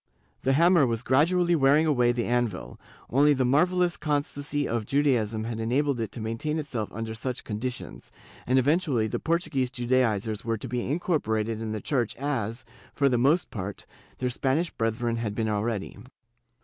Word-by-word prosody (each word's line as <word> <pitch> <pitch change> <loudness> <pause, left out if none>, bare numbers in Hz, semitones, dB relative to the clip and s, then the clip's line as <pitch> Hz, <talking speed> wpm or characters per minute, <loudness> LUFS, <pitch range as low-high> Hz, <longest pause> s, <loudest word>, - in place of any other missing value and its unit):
The 135 - +2
hammer 170 -1 +5
was 115 0 -2
gradually 170 +7 +3
wearing 145 +1 +4
away 125 -6 +3
the 120 -1 -1
anvil; 120 -5 -2 0.3
only 145 +3 +5
the 130 -1 +1
marvellous 175 +6 +2
constancy 145 -1 -1
of 115 -2 -2
Judaism 120 -7 +1
had 115 0 -4
enabled 130 +4 0
it 115 - -3
to - - -6
maintain 115 +8 -2
itself 125 -9 -4
under 110 +1 -5
such 125 +3 -4
conditions, 120 +4 -5 0.4
and 130 +2 +3
eventually 140 -3 +2
the 110 - -2
Portuguese 160 -6 0
Judaizers 120 -5 0
were 115 -1 -1
to 130 - -7
be 125 0 -3
incorporated 115 -9 -1
in 110 -1 -3
the 110 -1 -4
Church 125 -6 -1
as, 125 -4 -3 0.3
for 140 -1 +3
the 125 -2 +1
most 150 +8 +2
part, 100 -1 -6 0.3
their 125 -1 -1
Spanish 140 +7 0
brethren 115 +1 -1
had 110 -3 -3
been 110 0 -1
already. 105 -1 -2
125 Hz, 165 wpm, -27 LUFS, 115-145 Hz, 0.4 s, hammer